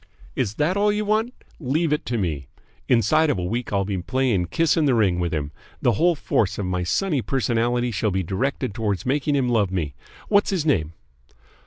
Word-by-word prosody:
"Is 100 - -1
that 155 +5 +1
all 205 +1 +3
you 210 +1 -1
want? 215 +3 +1 0.3
Leave 150 +2 0
it 150 - -2
to 120 0 -1
me. 75 - -2 0.4
Inside 140 +7 +3
of 145 - +1
a 90 - -3
week 115 +7 -3
I'll 100 -1 +1
be 100 -2 -2
playing 125 -4 0
kiss 165 - +2
in 160 -3 +2
the 135 -3 +3
ring 95 -6 +2
with 85 -2 -1
him. 75 -2 -3 0.3
The 120 - +3
whole 170 - +2
force 105 -8 0
of 100 - -2
my 90 0 -1
sunny 145 - 0
personality 120 -1 0
shall 105 0 0
be 95 -1 -1
directed 125 - -2
towards 105 -6 -2
making 145 +2 +1
him 135 -3 +1
love 110 -5 +2
me. 85 -6 -2 0.3
What's 205 -1 +3
his 185 -6 -1
name?" 85 - +1
120 Hz, 205 wpm, -23 LUFS, 95-150 Hz, 0.4 s, all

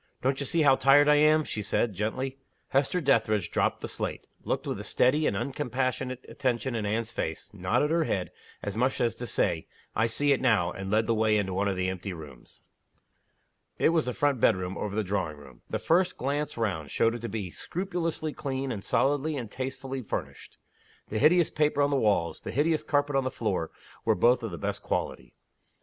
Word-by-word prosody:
"Don't 135 +1 +1
you 140 - -2
see 165 +3 +2
how 135 -2 +6
tired 140 +2 +5
I 150 0 +6
am?" 155 +1 +5
she 110 - -4
said, 105 +2 0
gently. 130 +7 -3 0.3
Hester 140 +6 +1
Dethridge 110 - +2
dropped - - 0
the - - -4
slate - - -4 0.2
looked - - -2
with - - -3
a - - -5
steady 150 +5 +2
and - - 0
uncompassionate 130 -2 -2
attention 130 -2 -1
in 110 -3 -2
Anne's 115 +2 -1
face 80 -7 -4
nodded 110 - +1
her 165 -1 +2
head, 95 -8 -2 0.3
as 100 - -3
much 125 +4 +1
as 120 -1 +2
to 120 - -6
say, - - 0 0.3
"I 115 +2 +3
see 145 +5 +2
it 135 - +2
now" 110 -9 +3
and 95 +1 -6
led 110 +2 +2
the 115 - +1
way 110 -1 +3
into 95 -2 -1
one 100 +2 0
of 100 - 0
the 90 0 -1
empty 95 +1 -4
rooms. 75 -7 -12 1.2
It - - +4
was 160 -4 +1
the 125 - -1
front 145 -3 +1
bedroom, 95 -2 +2
over 105 -1 -4
the 110 - +1
drawing 90 -6 -2
room. 70 -4 -15
The - - -1
first 180 +2 +2
glance 145 +2 -2
round 90 -10 -2
showed 115 +9 +2
it 120 - -4
to 115 0 -5
be 100 -5 -4
scrupulously 165 - -3
clean, 135 -2 -3
and 100 -4 -5
solidly 145 +2 +1
and 115 -5 -5
tastelessly 135 0 -4
furnished. 110 - -6 0.5
The 110 - -1
hideous 170 +4 +4
paper 150 -1 +1
on 140 - +2
the - - +2
walls, 105 -9 +1
the - - -7
hideous 155 +4 +1
carpet 145 -1 0
on 135 - +3
the 130 - -1
floor, 100 -10 -2 0.3
were - - +3
both 120 +7 +4
of 115 - -3
the 85 - -6
best - - -3
quality. - - -3
125 Hz, 205 wpm, -28 LUFS, 105-145 Hz, 1.2 s, how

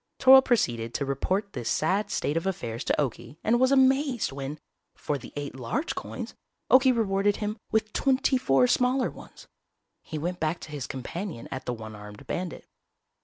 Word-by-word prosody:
Toryl 265 0 +8
proceeded 120 - 0
to 140 - -1
report 190 +9 -1
this 115 - -3
sad 190 +7 +1
state 145 - -1
of 165 +3 -1
affairs 120 -10 -3
to - - +2
Okie 145 +1 -3
and 240 +2 +3
was 260 +1 +4
amazed 265 - +3
when, 140 +2 -5 0.4
for 145 - -2
the 135 - -8
eight 145 -2 -5
large 130 - -2
coins, - - -6 0.4
Okie 260 0 +7
rewarded 200 -2 +2
him 210 0 -3 0.2
with 215 -1 0
twenty 265 -1 +2
four 135 - +4
smaller 250 - +2
ones. - - -14 0.5
He 155 - -6
went 175 +4 -3
back 160 +2 -1
to 150 - -9
his 145 -3 -5
companion 155 - -6
at 130 -1 -5
the 125 - 0
one 110 -2 -8
armed 105 0 -11
bandit. 180 -1 -4
175 Hz, 175 wpm, -27 LUFS, -, 0.5 s, Toryl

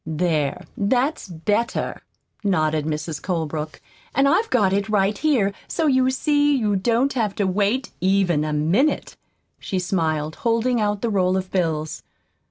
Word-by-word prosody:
"There, 155 -2 -1
that's 250 +7 0
better," 205 +7 -2 0.4
nodded 155 -6 +1
Mrs. 155 -1 -3
Colebrook. 155 -4 -3 0.4
"And 275 +2 +4
I've 425 +10 +2
got 200 -6 +2
it 200 +2 0
right 205 -1 +2
here, 235 -10 +1
so 325 - -1
you 260 -3 +3
see 290 +2 +2
you 215 -6 +1
don't 235 +7 +1
have 215 -6 -1
to 205 - 0
wait, 205 +7 0
even 185 -5 +2
a 155 - -2
minute," 170 - +1 0.4
she 190 - -3
smiled, 160 -4 -1
holding 235 +1 +1
out 205 0 -1
the 230 - 0
roll 185 -2 +2
of 185 0 -4
bills. 160 -4 -1
195 Hz, 150 wpm, -22 LUFS, 160-235 Hz, 0.4 s, And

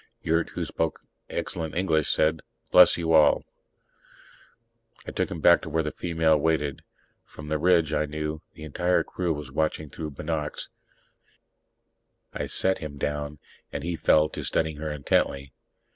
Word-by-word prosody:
Yurt, 80 +1 +1
who - - -4
spoke 80 -1 -2 0.3
excellent 80 -1 -3
English, 80 -4 +1
said, 80 0 +2 0.3
"Bless - - +7
you 80 -1 0
all." 75 -2 +5 1.6
I - - -6
took - - -1
him 85 - -6
back 85 +2 +6
to 80 - -7
where 80 +1 0
the 75 - -3
female 80 -2 +1
waited. 75 -3 0 0.4
From 75 0 -11
the 75 0 0
ridge, 85 -2 +3
I 75 - +1
knew, 75 +1 -4
the 75 - -10
entire 90 +4 +1
crew 90 -2 -2
was 75 -4 -5
watching 80 0 -1
through 80 -2 -5
binocs. 75 +1 -4 1.6
I - - -3
set 95 0 +1
him 75 -2 -7
down, 75 +1 -3 0.3
and - - -5
he 85 0 -2
fell 75 -1 +4
to - - -6
studying 80 -2 0
her 75 +1 -4
intently. 70 -1 0
80 Hz, 155 wpm, -26 LUFS, 75-80 Hz, 1.6 s, Bless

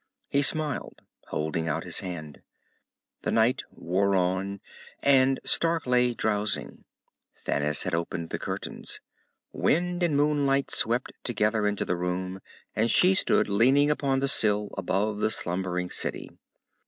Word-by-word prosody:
He 140 - +2
smiled, 150 0 0 0.2
holding 80 +1 -2
out 80 - -1
his - - 0
hand. 80 -5 -7 0.8
The - - -3
night 115 +4 +2
wore 100 +3 0
on, 95 +2 -1 0.4
and 135 -1 +4
Stark 165 0 +2
lay 125 -1 +2
drowsing. 105 -2 -2 0.6
Thanis 75 +1 +1
had 90 - -3
opened 85 0 -3
the - - -3
curtains. - - -6 0.5
Wind 180 +2 0
and 165 -5 +1
moonlight 145 -2 +1
swept 120 +3 0
together 105 -2 0
into 105 -1 -1
the - - -1
room, 90 +2 -3 0.4
and 115 +2 +1
she 185 +8 +5
stood 190 - +2
leaning 130 +8 +4
upon 135 -2 0
the 140 - +1
sill, 105 -6 +3
above 105 +2 -1
the 110 - +1
slumbering 90 -2 -2
city. - - -1
105 Hz, 135 wpm, -27 LUFS, 90-135 Hz, 0.8 s, she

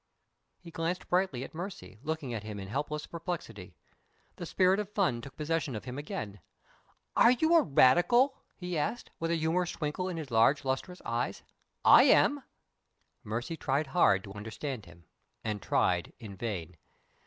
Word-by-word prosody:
He 170 -2 -13
glanced 165 +3 -3
brightly 180 -9 +1
at - - -9
Mercy, 175 - -7
looking 155 -4 -3
at 110 - -3
him 105 -1 -7
in 95 - -7
helpless 150 +5 -3
perplexity. 170 +1 -6 0.6
The 175 -4 -6
spirit 185 +3 +3
of 210 -2 -3
fun 185 - 0
took 135 +2 -11
possession 155 -3 -1
of 105 - -6
him 130 +2 -5
again. 105 -8 -6 0.8
"Are 235 - +7
you 315 +7 +3
a 335 - +7
Radical?" 175 - +4 0.2
he 180 -3 -3
asked, 235 +11 -3
with 165 - -1
a 170 - +2
humorous 165 +2 0
twinkle 160 +4 -3
in 175 - -4
his 150 -5 -6
large 115 +6 +4
lustrous 135 +8 -3
eyes. 120 +1 -2 0.4
"I - - +9
am!" 290 0 +4 0.8
Mercy 120 +9 -3
tried 145 -1 0
hard 100 - +3
to 100 - -9
understand 110 - -6
him, 85 0 -16 0.4
and 105 -2 -3
tried - - +1
in 100 -3 -9
vain. 90 -6 -5
150 Hz, 165 wpm, -30 LUFS, 115-180 Hz, 0.8 s, I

